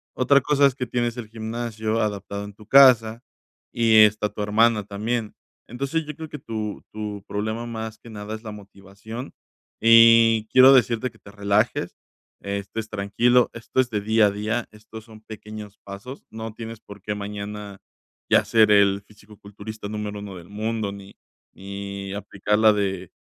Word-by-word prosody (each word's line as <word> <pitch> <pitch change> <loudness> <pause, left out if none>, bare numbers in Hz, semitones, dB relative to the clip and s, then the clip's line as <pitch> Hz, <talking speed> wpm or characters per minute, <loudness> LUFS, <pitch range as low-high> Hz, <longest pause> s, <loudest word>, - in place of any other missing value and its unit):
otra 140 +2 +4
cosa 145 +1 +3
es 140 - +3
que 125 -3 -4
tienes 120 -1 -1
el 120 -3 -6
gimnasio 110 0 -3
adaptado 100 -1 -3
en 100 - -10
tu 105 +1 -17
casa 120 -3 +6 0.5
y 115 -2 +3
está 105 0 0
tu - - -5
hermana 105 +1 +3
también, 110 +2 -3 0.3
entonces, 140 +7 -3
yo 150 0 -7
creo 160 +1 -8
que 150 - -8
tu 110 -4 -5
tu 105 -2 -6
problema 110 +3 -3
más 110 -1 -6
que 115 - -14
nada 105 -1 -7
es 110 +1 -7
la 110 - -7
motivación 100 +4 -10 0.5
y 115 -1 +7
quiero 130 +1 +8
decirte 125 -1 +2
que - - -23
te - - -15
relajes, 100 +3 0 0.4
estés 100 +2 -5
tranquilo, 115 +4 +2
esto 115 +3 -1
es 125 - -3
de 105 -3 -1
día 110 +1 +3
a - - 0
día, 110 +3 -2
estos 110 +1 -12
son 110 -1 -15
pequeños 105 -1 -10
pasos, 100 +8 -9
no 110 0 -7
tienes 115 0 -8
por 100 -2 -13
qué 105 +2 -3
mañana 105 0 -7 0.5
ya - - +4
ser 110 -2 +4
el 100 -1 +4
fisicoculturista 105 0 -11
número 105 -1 -5
1 100 -2 -8
del 85 - -12
mundo, 110 0 -3
ni 100 0 -12 0.4
ni 100 0 -7
aplicar 100 +1 -2
la 110 0 +6
de 100 -3 -2
110 Hz, 170 wpm, -23 LUFS, 100-115 Hz, 0.5 s, quiero